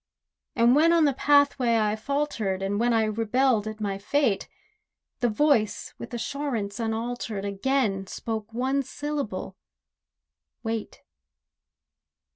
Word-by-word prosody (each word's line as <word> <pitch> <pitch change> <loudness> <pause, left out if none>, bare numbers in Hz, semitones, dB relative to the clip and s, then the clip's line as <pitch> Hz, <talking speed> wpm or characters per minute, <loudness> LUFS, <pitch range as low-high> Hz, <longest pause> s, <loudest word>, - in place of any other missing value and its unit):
And 235 +2 +5
when 320 +3 +5
on 330 -2 +5
the 285 - +3
pathway 280 -4 +3
I 215 -1 +1
faltered, 220 -6 -2
And 200 +1 -1
when 240 +1 +2
I 225 -1 +3
rebelled 225 +1 +1
at 215 0 -6
my 200 -2 -2
fate, 225 -1 0 0.7
The 245 -1 +2
Voice 230 -2 +1
with 235 - -8
assurance 240 -4 -3
unaltered, 225 -2 -3
Again 200 -1 0
spoke 220 +2 -5
one 260 +4 0
syllable—"Wait." 230 -4 -7
230 Hz, 110 wpm, -26 LUFS, 210-275 Hz, 0.7 s, And